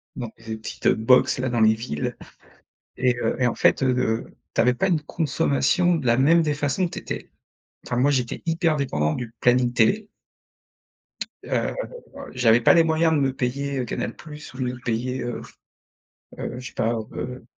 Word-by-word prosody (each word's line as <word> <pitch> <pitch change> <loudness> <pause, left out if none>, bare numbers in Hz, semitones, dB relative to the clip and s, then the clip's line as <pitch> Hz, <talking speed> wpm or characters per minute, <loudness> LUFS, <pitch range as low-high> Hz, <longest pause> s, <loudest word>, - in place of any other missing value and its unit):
dans 120 -4 -5
des 110 0 -6
petites 110 - -4
box, 120 +5 +4
là, 130 - -1
dans 120 -1 0
les 110 0 +6
villes 110 -10 -4 0.8
et 125 -1 +2
heu 115 - 0
et 125 - +3
en 120 - 0
fait, - - +3
heu, 125 -3 +1 0.3
tu - - +2
avais 125 +1 +4
pas 160 +10 0
une 170 -4 +2
consommation 150 - +1
de 140 - -4
la 120 0 +4
même 165 +5 +5
des 150 -2 0
façons, 145 +5 0
tu - - -7
étais - - -6 0.6
enfin, 125 - -2
moi, 135 +3 +4
j'étais 125 -4 -1
hyper 165 -1 +1
dépendant 75 - 0
du 120 -2 -5
planning 125 0 +3
télé 195 - +2 1.4
heu, - - -1 0.6
j'avais 120 -2 +4
pas - - +6
les 170 - +6
moyens 160 0 +2
de 150 - +2
me 135 -1 +1
payer, 135 +2 -2
heu, 125 - -1
Canal - - -4
Plus 150 -3 -11
ou 130 - -11
de - - 0
me - - -8
payer, 125 +3 -2
heu 120 -1 -4 1.0
heu, 125 - -5
je 125 - -7
sais - - -11
pas, 115 - 0 0.2
heu 125 -1 -6
125 Hz, 190 wpm, -24 LUFS, 120-150 Hz, 1.4 s, les